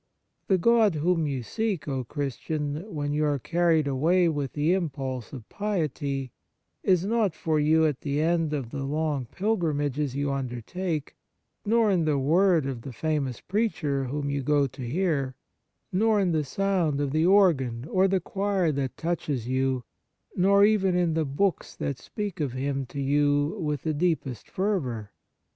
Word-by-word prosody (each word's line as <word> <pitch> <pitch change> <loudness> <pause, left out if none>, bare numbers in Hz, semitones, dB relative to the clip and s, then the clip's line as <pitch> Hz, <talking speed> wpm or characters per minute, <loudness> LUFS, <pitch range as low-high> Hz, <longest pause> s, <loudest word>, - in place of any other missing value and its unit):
The 190 - +4
God 220 -1 +4
whom 165 +1 +1
you 135 -4 -3
seek, 215 - -2
O 135 -2 -2
Christian, 145 - -4
when 145 -3 -2
you 150 +1 +1
are 145 -1 +1
carried 165 +2 +2
away 165 +7 +3
with 145 -4 -2
the 150 +4 +2
impulse 135 - -3
of 125 -6 -9
piety, 145 - -2 0.5
is 185 -1 +2
not 210 -5 +1
for 155 -2 0
you 160 +2 +4
at 150 -4 -1
the 145 0 -1
end 165 0 +1
of 135 -6 -3
the 140 -1 -4
long 145 -1 -1
pilgrimages 150 - -1
you 140 0 0
undertake, 140 +6 -4 0.5
nor 225 -1 +4
in 175 -4 +2
the 150 -2 +2
word 165 +3 +3
of 130 -4 -4
the 135 - -7
famous 140 -1 -2
preacher 175 -10 -1
whom 145 +3 -3
you 140 0 -1
go 145 +1 +2
to 135 +1 -8
hear, 140 -1 -1 0.6
nor 215 +2 +3
in 190 -3 +2
the 155 -2 +1
sound 175 -2 0
of 145 -2 -1
the 155 +3 +2
organ 140 - +3
or 185 +3 +3
the 190 0 +2
choir 195 -3 0
that 135 -3 -3
touch 170 -1 -2
you, 130 0 0 0.5
nor 200 +2 +5
even 195 -4 +3
in 175 -2 +2
the 160 -1 +1
books 170 +8 -1
that 140 -3 -3
speak 205 -5 -5
of 140 -5 -1
Him 135 0 -2
to 140 - -7
you 145 +3 +2
with 150 -3 -2
the 155 - 0
deepest 150 -6 -1
fervour. 130 - -2
150 Hz, 165 wpm, -27 LUFS, 140-180 Hz, 0.6 s, nor